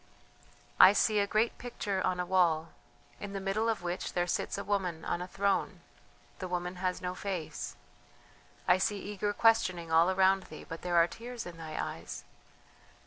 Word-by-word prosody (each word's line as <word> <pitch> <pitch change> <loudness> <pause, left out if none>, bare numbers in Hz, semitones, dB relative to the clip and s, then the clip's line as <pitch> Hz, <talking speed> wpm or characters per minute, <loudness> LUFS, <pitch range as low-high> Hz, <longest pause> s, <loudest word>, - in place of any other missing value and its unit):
"I 195 - +10
see 210 0 +3
a 200 - +2
great 215 +3 +1
picture 205 -5 -3
on 185 -1 0
a 180 - 0
wall 170 -3 +2 0.5
in 200 -1 -6
the 195 - -2
middle 200 +4 0
of 220 -6 -1
which 175 +1 -3
there 175 0 +1
sits 175 - -2
a 200 - -3
woman 185 -5 -1
on 175 - -1
a 180 - -4
throne, 200 +1 0 0.6
the 185 - -4
woman 180 0 -3
has 185 0 -2
no 180 0 -2
face.... 185 -4 -4 0.9
I 185 - +5
see 205 +2 +1
eager 205 +1 -2
questioning 185 -7 +2
all 165 +2 +5
around 190 0 +3
thee, 155 - -10
but 165 - -7
there 175 -1 -1
are 170 - +7
tears 240 +4 -7
in 175 -1 -8
thy 160 -1 -6
eyes.... 85 +2 -5
185 Hz, 180 wpm, -31 LUFS, 175-200 Hz, 0.9 s, I